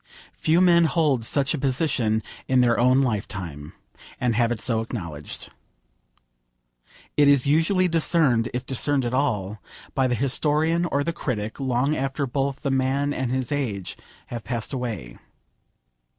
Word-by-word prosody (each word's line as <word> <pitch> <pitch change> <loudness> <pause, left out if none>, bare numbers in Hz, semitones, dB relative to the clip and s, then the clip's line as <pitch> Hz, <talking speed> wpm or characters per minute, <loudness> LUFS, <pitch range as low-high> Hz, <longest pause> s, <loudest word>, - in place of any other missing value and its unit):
Few 160 +2 +2
men 170 -2 +5
hold 150 -7 +1
such 140 +5 0
a 155 - -2
position 130 -5 0 0.2
in 130 -1 +3
their 120 -1 +3
own 130 +2 +4
lifetime, 90 - -4 0.5
and 125 -2 +1
have 115 +1 +2
it 120 - -2
so 115 -2 +1
acknowledged. 85 - -7 1.7
It 145 -1 +5
is 140 -3 +5
usually 165 +6 +3
discerned, 155 -8 +3
if 125 +1 -4
discerned 135 +1 0
at 120 - -2
all, 105 -7 -1 0.3
by 130 -1 +2
the 125 - 0
historian, 155 +6 +1
or 145 -4 0
the 170 - -2
critic, 110 -7 -4
long 135 +2 0
after 135 +1 -2
both 135 +1 -2
the 140 - -1
man 135 +2 +1
and 130 -3 -2
his 130 0 -2
age 115 -10 -3 0.3
have 120 -2 -6
passed 120 +1 -3
away. 110 - -5
130 Hz, 150 wpm, -24 LUFS, 115-145 Hz, 1.7 s, men